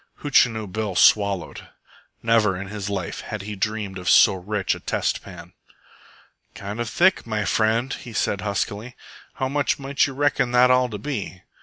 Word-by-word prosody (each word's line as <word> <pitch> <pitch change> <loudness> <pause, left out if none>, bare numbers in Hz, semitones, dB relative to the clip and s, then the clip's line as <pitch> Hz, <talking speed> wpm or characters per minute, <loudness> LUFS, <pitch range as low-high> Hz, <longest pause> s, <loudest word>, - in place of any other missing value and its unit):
Hootchinoo 120 -6 +3
Bill 105 0 -4
swallowed. 100 -2 +2 0.6
Never 110 -5 +2
in 100 -1 -7
his 105 -1 -5
life 100 -2 -4
had 110 -2 -6
he 105 +1 -6
dreamed 100 -1 -3
of 90 - -2
so - - +7
rich 95 +2 -2
a - - -7
test - - -2
pan. 90 -2 -12 1.0
"Kind 100 +3 -6
of 120 -1 -2
thick, 190 -2 +2
my 105 -2 -2
friend," 115 +5 +1
he 120 - -8
said 105 -2 -1
huskily. 105 +3 -3 0.4
"How 130 - -1
much 140 +1 0
might 140 0 0
you 135 - -8
reckon 135 -3 +1
that 125 +1 +5
all 125 0 +3
to 105 - -5
be?" 105 -6 -5
110 Hz, 170 wpm, -23 LUFS, 100-125 Hz, 1.0 s, so